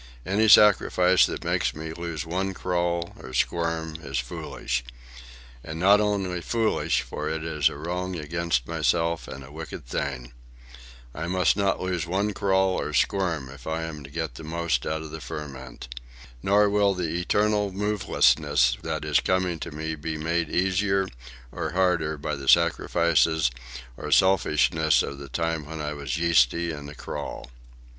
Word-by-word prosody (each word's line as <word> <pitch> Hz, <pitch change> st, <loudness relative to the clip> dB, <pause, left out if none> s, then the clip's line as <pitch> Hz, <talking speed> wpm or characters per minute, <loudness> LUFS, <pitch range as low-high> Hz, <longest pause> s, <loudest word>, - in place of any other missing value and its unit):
Any 105 Hz, +4 st, +2 dB
sacrifice 95 Hz, -3 st, +6 dB
that -, -, -5 dB
makes -, -, 0 dB
me 80 Hz, +1 st, -6 dB
lose 85 Hz, -2 st, -5 dB
one 95 Hz, +3 st, -2 dB
crawl 85 Hz, -1 st, -1 dB
or 65 Hz, 0 st, -9 dB
squirm 80 Hz, +1 st, -1 dB
is 70 Hz, -2 st, -4 dB
foolish,—and -, -, -6 dB
not 100 Hz, +4 st, +6 dB
only 95 Hz, -4 st, -1 dB
foolish, 115 Hz, +6 st, 0 dB
for 75 Hz, +1 st, -4 dB
it 80 Hz, 0 st, -3 dB
is 75 Hz, -4 st, +2 dB
a -, -, -8 dB
wrong 90 Hz, +4 st, -3 dB
against 80 Hz, -5 st, -1 dB
myself 85 Hz, -1 st, 0 dB
and 65 Hz, +1 st, -8 dB
a 65 Hz, -, -13 dB
wicked 80 Hz, -4 st, -8 dB
thing. 60 Hz, -1 st, -4 dB, 0.8 s
I 80 Hz, +3 st, -4 dB
must 90 Hz, -1 st, +2 dB
not 100 Hz, -1 st, +1 dB
lose 90 Hz, -2 st, -2 dB
one 100 Hz, +4 st, 0 dB
crawl 95 Hz, -2 st, +1 dB
or 75 Hz, -, -4 dB
squirm 85 Hz, -4 st, +1 dB
if 70 Hz, -2 st, -12 dB
I 80 Hz, +1 st, -2 dB
am 80 Hz, -3 st, -6 dB
to 70 Hz, -, -10 dB
get 80 Hz, -2 st, -4 dB
the 75 Hz, -, -10 dB
most 80 Hz, -5 st, -1 dB
out 80 Hz, 0 st, -2 dB
of 80 Hz, -, -9 dB
the 80 Hz, 0 st, -7 dB
ferment. 65 Hz, -6 st, -8 dB, 0.5 s
Nor 100 Hz, +4 st, +4 dB
will 100 Hz, -1 st, +2 dB
the 85 Hz, -2 st, -2 dB
eternal 105 Hz, +2 st, +1 dB
movelessness 95 Hz, -7 st, +2 dB
that -, -, -3 dB
is -, -, +3 dB
coming 90 Hz, -2 st, 0 dB
to -, -, -5 dB
me 80 Hz, +1 st, -4 dB
be 80 Hz, +1 st, -4 dB
made 85 Hz, +1 st, -1 dB
easier 95 Hz, +1 st, +1 dB, 0.4 s
or -, -, -4 dB
harder 90 Hz, -4 st, +1 dB
by 75 Hz, +1 st, -3 dB
the 70 Hz, -1 st, -8 dB
sacrifices 85 Hz, -2 st, +3 dB, 0.4 s
or 75 Hz, +4 st, -6 dB
selfishnesses 80 Hz, -4 st, +3 dB
of 70 Hz, -, -6 dB
the 70 Hz, -1 st, -9 dB
time 80 Hz, +1 st, -2 dB
when 80 Hz, 0 st, -7 dB
I 75 Hz, 0 st, -3 dB
was 70 Hz, -1 st, -4 dB
yeasty 85 Hz, 0 st, +3 dB
and 70 Hz, -2 st, -7 dB
acrawl." 70 Hz, -3 st, -7 dB
80 Hz, 160 wpm, -26 LUFS, 75-90 Hz, 0.8 s, sacrifice